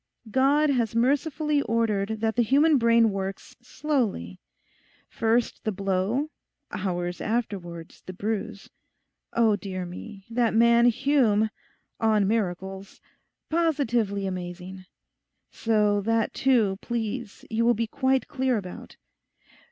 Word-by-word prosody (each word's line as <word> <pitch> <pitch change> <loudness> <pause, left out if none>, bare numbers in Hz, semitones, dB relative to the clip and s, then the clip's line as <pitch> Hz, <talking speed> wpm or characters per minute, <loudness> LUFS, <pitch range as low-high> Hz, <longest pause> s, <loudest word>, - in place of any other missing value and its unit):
God 280 +4 +3
has 235 -4 0
mercifully 290 +4 +1
ordered 220 -3 0
that 225 0 0
the 240 - +3
human 285 +5 +4
brain 230 -1 +4
works 195 0 -5
slowly; 240 - -2 0.7
first 230 +1 0
the 215 - 0
blow, 200 +9 -1 0.4
hours 175 -2 -3
afterwards 190 -7 -4
the - - -4
bruise. 210 +1 -4 0.6
Oh, 225 -3 +4
dear 185 -3 -5
me, 195 +3 -9
that 230 -1 0
man 235 +1 +5
Hume—"on 220 -4 +1
miracles"—positively 210 - -2
amazing! 185 0 -6 0.7
So 210 -2 +1
that 225 +1 0
too, 230 -7 +2
please, 235 -1 -4
you 225 +1 +1
will 240 0 +4
be 230 +2 0
quite 260 +3 0
clear 260 -3 0
about. 185 -3 -8
225 Hz, 105 wpm, -26 LUFS, 195-245 Hz, 0.7 s, man